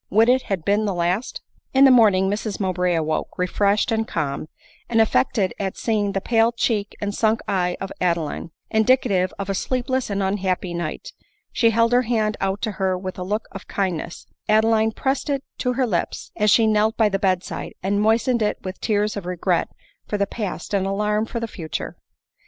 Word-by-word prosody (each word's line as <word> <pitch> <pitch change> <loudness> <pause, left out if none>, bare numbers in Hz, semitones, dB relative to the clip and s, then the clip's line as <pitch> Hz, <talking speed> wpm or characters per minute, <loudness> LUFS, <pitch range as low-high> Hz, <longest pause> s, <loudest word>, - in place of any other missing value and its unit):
Would 225 +4 +4
it 260 +1 +4
had 190 -5 -2
been 205 +2 +2
the 200 -3 -1
last! 175 +7 -1 0.3
In 270 +1 +7
the 270 - +7
morning 205 -6 +5
Mrs 205 +1 -2
Mowbray 180 -2 0
awoke, 155 -1 -2
refreshed 200 +5 +1
and 225 0 0
calm; 150 -2 -3 0.4
and 225 - +2
affected 190 - +2
at 195 -2 -3
seeing 210 -3 0
the 195 - 0
pale 225 +2 +2
cheek 220 -3 -1
and 205 0 -2
sunk 220 +1 +2
eye 180 -2 0
of 195 - -5
Adeline, 170 -3 -1 0.2
indicative 220 -5 +3
of 200 - -4
a 195 - -1
sleepless 255 +4 -1
and 200 -1 -1
unhappy 190 -2 -1
night, 170 -2 -5 0.4
she 230 - +4
held 230 +1 +2
her 245 +1 +5
hand 220 -3 0
out 195 +1 -1
to 220 - 0
her 190 -1 +1
with 185 0 -6
a - - -3
look 210 +4 -2
of 195 - -9
kind 190 -4 -1
ness; 170 - -8 0.2
Adeline 220 +1 +3
pressed 265 +5 -2
it 275 -1 -1 0.2
to 250 -1 0
her 255 +1 +1
lips, 180 -8 -2
as 210 0 +2
she 225 +2 +5
knelt 215 0 +2
by 220 - +4
the 195 -1 -1
bed 185 -3 +1
side, - - -6
and 200 +2 +1
moistened 225 +3 +2
it 210 - +1
with 185 0 -6
tears 210 -1 0
of 200 -4 -5
regret 180 -1 0 0.4
for 210 - -1
the 200 - +1
past 200 -3 -5
and 195 -1 +1
alarm 210 +2 0
for 235 - -4
the 230 - -3
future. 165 -7 -5
205 Hz, 200 wpm, -22 LUFS, 185-225 Hz, 0.4 s, In